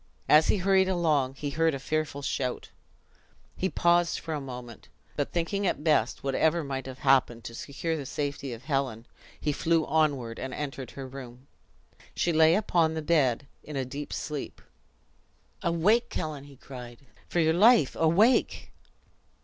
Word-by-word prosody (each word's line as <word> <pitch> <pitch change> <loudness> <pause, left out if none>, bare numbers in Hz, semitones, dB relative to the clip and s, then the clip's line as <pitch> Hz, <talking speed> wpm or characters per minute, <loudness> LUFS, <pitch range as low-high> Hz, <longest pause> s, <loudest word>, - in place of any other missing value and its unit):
As 155 +1 +6
he - - +3
hurried 190 0 +3
along, 155 -7 +1
he 145 +1 -4
heard 160 0 +1
a - - -5
fearful 150 0 -2
shout. 130 -2 -3 0.8
He 190 - -1
paused 175 -1 +2
for 160 - -5
a 150 - -3
moment, 125 -3 -9 0.3
but - - -2
thinking 175 +4 -1
it 180 - -1
best, 150 -7 +1
whatever 160 +5 +1
might 135 -2 -4
have 130 -1 -8
happened, 130 -4 +3
to 115 - -8
secure 145 +7 -4
the 140 -4 -5
safety 140 -1 -3
of 115 +1 -8
Helen, 130 -5 -2 0.3
he 150 - 0
flew 165 +2 +1
onward, 140 -8 0
and 130 -1 -5
entered 135 -4 -5
her 135 -1 -5
room. 130 -1 -10 0.7
She 175 - +1
lay 160 +1 +5
upon 170 -6 +1
the 160 - -3
bed 140 -6 +2 0.2
in 150 - -9
a 135 -1 -1
deep 140 +3 -7
sleep. 150 -2 -5 1.0
"Awake, 200 +8 +2
Helen!" 150 -3 -4
he 140 -1 -14
cried; 125 -1 -11 0.2
"for 175 - 0
your 160 -1 +3
life, 215 - +5
awake!" 190 +10 +2
150 Hz, 160 wpm, -28 LUFS, 135-165 Hz, 1.0 s, As